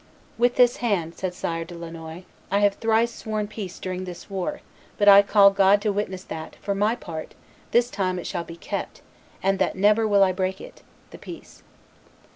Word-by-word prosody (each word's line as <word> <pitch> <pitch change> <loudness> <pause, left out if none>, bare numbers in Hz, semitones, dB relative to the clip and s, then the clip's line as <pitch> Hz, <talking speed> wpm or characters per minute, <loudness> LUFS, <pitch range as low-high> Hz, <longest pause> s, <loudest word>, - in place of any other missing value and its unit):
"With 245 +1 +2
this 245 -1 +4
hand," 185 -9 -1
said 185 -1 -4
Sire 165 -2 -3
de 170 +1 -11
Lannoy, 165 0 -8 0.3
"I 200 +1 +1
have 205 -1 +4
thrice 225 +2 +1
sworn 215 -2 -3
peace 205 -4 -7
during 185 0 -5
this 180 +2 -10
war; 190 -2 -3 0.4
but 205 - +1
I 200 0 +10
call 200 0 +5
God 195 +1 +4
to 215 - +1
witness 190 -2 -3
that, 160 -3 -8
for 200 - -3
my 210 +4 +1
part, 165 -9 -8 0.3
this 240 +1 +2
time 185 -2 -1
it 175 - -6
shall 175 -3 -3
be 165 0 -10
kept, - - -6 0.4
and 195 0 +1
that 190 - +1
never 210 +3 +3
will 200 -2 +5
I 190 - +3
break 185 +1 -2
it - - -12 0.3
(the - - -11
peace)." - - -11
195 Hz, 195 wpm, -24 LUFS, 180-210 Hz, 0.4 s, I